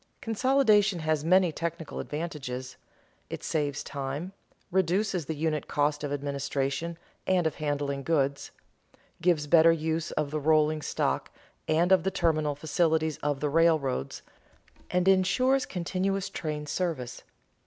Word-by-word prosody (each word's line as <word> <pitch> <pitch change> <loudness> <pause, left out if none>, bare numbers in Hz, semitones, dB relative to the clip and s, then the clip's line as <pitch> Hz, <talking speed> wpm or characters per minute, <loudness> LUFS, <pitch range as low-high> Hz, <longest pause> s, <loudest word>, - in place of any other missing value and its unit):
Consolidation 220 -5 +3
has 155 -1 0
many 180 +1 +4
technical 165 0 -5
advantages: 135 -5 -5 0.5
it - - -6
saves 150 -3 -1
time, 140 +6 -5 0.4
reduces 185 -2 +1
the 160 - -2
unit 155 -1 -1
cost 145 0 0
of 145 - -3
administration 140 +3 -2 0.3
and 185 -2 +2
of 160 - -1
handling 145 -2 -2
goods, 140 -2 0 0.7
gives 170 -4 +2
better 165 +2 +6
use 160 0 -1
of 150 -2 -1
the 155 - -1
rolling 155 0 +3
stock - - -1 0.4
and 165 +4 +2
of 190 -2 +6
the 190 - 0
terminal 155 -6 0
facilities 160 +1 +1
of 145 -2 -2
the 150 - 0
railroads, 150 - +1 0.7
and 180 +1 +1
insures 250 +8 +3
continuous 185 +2 -2
train 150 -2 -4
service. 150 -6 -3
160 Hz, 130 wpm, -28 LUFS, 145-180 Hz, 0.7 s, better